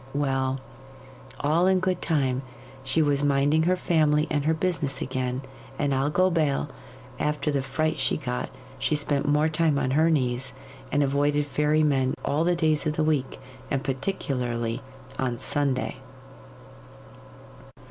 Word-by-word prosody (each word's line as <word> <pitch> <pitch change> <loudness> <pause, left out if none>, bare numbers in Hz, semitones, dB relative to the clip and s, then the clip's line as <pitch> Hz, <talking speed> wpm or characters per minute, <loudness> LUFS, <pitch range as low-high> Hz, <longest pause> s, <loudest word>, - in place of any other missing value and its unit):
Well, 135 -2 0 0.8
all 160 +5 +3
in 190 -1 +4
good 185 -1 -1
time 135 -5 +1 0.4
she 160 - +2
was 145 -1 +1
minding 145 +2 +3
her 185 - +2
family 155 -4 +2
and 145 -2 0
her 160 - +3
business 160 -5 -1
again; 130 0 -2 0.3
and 145 -1 0
I'll 135 +2 +1
go 185 +4 +3
bail, 155 -5 +1 0.5
after 150 0 0
the 140 -1 0
fright 155 +4 -1
she - - +1
got, 60 0 -3 0.3
she 150 - +1
spent 145 -1 0
more 150 +2 +3
time 160 -2 +1
on 130 -2 0
her 155 +4 +4
knees, 130 -4 0 0.4
and 145 0 +3
avoided 145 +1 +1
fairy 150 +2 +2
men 135 -3 +2
all 150 +3 +1
the 175 +1 +2
days 155 -3 +1
of 150 - -1
the 155 - +1
week, 150 -4 0 0.3
and 135 -1 -1
particularly 125 -5 -2 0.4
on 125 -2 -1
Sunday. 140 0 -1
145 Hz, 145 wpm, -26 LUFS, 135-155 Hz, 0.8 s, in